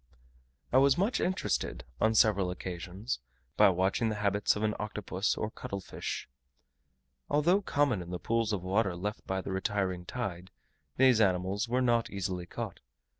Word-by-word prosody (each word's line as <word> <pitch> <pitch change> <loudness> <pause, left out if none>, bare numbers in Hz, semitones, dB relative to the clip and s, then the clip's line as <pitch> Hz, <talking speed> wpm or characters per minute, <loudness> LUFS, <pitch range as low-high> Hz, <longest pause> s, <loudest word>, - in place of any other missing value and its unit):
I 130 - +7
was 135 0 +5
much 200 +7 +1
interested, 180 - -1 0.2
on 110 0 +3
several 100 -4 +4
occasions, 90 - -4 0.4
by - - +7
watching 95 +5 +1
the 110 - -2
habits 100 0 +1
of 105 - -3
an 105 0 +2
Octopus, 105 -2 -2
or 105 - -2
cuttle 100 - -5
fish. 95 - -5 1.0
Although 170 +7 +3
common 145 - +1
in 85 - -8
the 90 - -3
pools 115 +3 0
of 100 -4 -2
water 95 0 +1
left 105 +4 -4
by 95 0 -1
the 95 - -5
retiring 95 -2 -1
tide, 95 -7 -4 0.5
these 130 -4 +5
animals 95 +3 +1
were 125 +1 +2
not 120 -2 +2
easily 90 -3 -3
caught. - - -5
105 Hz, 160 wpm, -31 LUFS, 95-115 Hz, 1.0 s, I